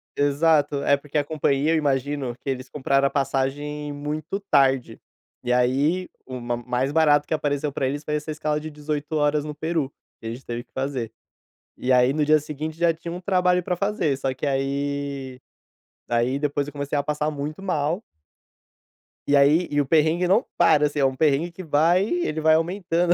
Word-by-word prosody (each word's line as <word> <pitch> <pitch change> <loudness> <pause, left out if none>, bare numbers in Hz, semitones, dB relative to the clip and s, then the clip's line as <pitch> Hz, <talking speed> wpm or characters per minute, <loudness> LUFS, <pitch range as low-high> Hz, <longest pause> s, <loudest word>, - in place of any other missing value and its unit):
Exato. 145 0 +2
É 140 - +4
porque 145 +1 -5
a 145 - +2
companhia, 145 0 +1
eu 165 - +3
imagino, 140 -3 -1
que 140 - -4
eles 130 0 -4
compraram 140 -1 +1
a - - -2
passagem 145 +2 -2
muito 150 +6 -4
tarde. 135 - +2 0.4
E 125 - -1
aí, 135 +9 +2 0.2
o 130 -1 -6
ma 120 0 -2
mais 125 +3 -1
barato 150 -2 +4
que - - -2
apareceu 145 -1 -1
pra 135 -1 -1
eles, 145 +2 -3
foi 150 - -2
essa 150 +1 -4
escala, 150 0 -1
de 155 +1 -7
18 150 +1 -4
horas 150 0 +2
no 150 -1 -6
Peru, 160 -3 -2 0.3
que 115 - -8
a - - -2
gente 120 +4 -8
teve 120 0 -4
que - - -43
fazer. 130 -4 -3 0.7
E 130 +1 0
aí, 125 +1 +4
no 150 0 +1
dia 155 +1 +5
seguinte, 155 +1 -6
já 170 -1 +3
tinha 170 +1 -7
um 180 - -6
trabalho 180 -1 +2
pra 180 - -2
fazer, 200 -8 0
só 135 -1 -2
que 130 - -4
aí 140 -1 -2 0.7
aí 120 +3 +1
depois 145 -1 -1
eu 145 - -8
comecei 145 0 -3
a 145 - +1
passar 150 +1 -1
muito 150 +5 -5
mal 170 +1 -1 1.3
e 145 - +4
aí 150 +5 +4
e 145 - 0
o 145 - +2
perrengue 160 +4 +2
não 200 +6 +4
para, 155 -4 +5
assim, 145 0 -4
é 135 - +4
um 130 - +1
perrengue 155 +4 +2
que 185 +2 -9
vai, 165 +5 +3
ele 345 - -1
vai 155 0 +5
aumentando, 175 0 +1
145 Hz, 195 wpm, -24 LUFS, 135-160 Hz, 1.3 s, dia